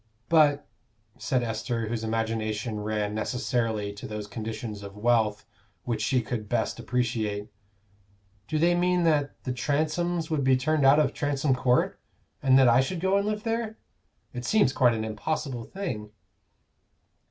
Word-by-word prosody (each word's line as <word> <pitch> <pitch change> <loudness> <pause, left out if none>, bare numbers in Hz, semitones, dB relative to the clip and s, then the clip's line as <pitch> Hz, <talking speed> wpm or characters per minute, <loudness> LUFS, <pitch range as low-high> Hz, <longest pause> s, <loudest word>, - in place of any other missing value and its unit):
"But," 150 -3 +4 0.5
said 125 -2 0
Esther, 115 0 -2
whose 115 0 -3
imagination 110 -1 -2
ran 105 0 -2
necessarily 110 -2 -1
to 100 - -8
those 105 -1 -5
conditions 110 0 -6
of 100 0 -9
wealth 110 -2 +1 0.4
which 120 -2 -2
she 130 -3 +1
could 110 -2 -4
best 120 -1 -1
appreciate, 115 -4 -1 1.0
"Do 155 - -1
they 170 +3 +4
mean 180 0 +2
that 150 -3 +1
the 130 - -2
Transomes 160 +5 -1
would 150 -3 +1
be 130 0 +4
turned 150 +1 +2
out 140 +2 +7
of 140 -3 +2
Transome 145 -2 0
Court, 125 -1 +1 0.4
and 130 -1 +5
that 135 -1 +6
I 120 +2 +6
should 170 +7 -3
go 190 +3 +2
and 200 +1 +1
live 210 0 -2
there? 225 -1 -2 0.6
It 120 -1 -5
seems 140 - +3
quite 120 -4 +4
an 110 0 -2
impossible 120 +2 -3
thing." 125 - -5
125 Hz, 155 wpm, -27 LUFS, 110-150 Hz, 1.0 s, out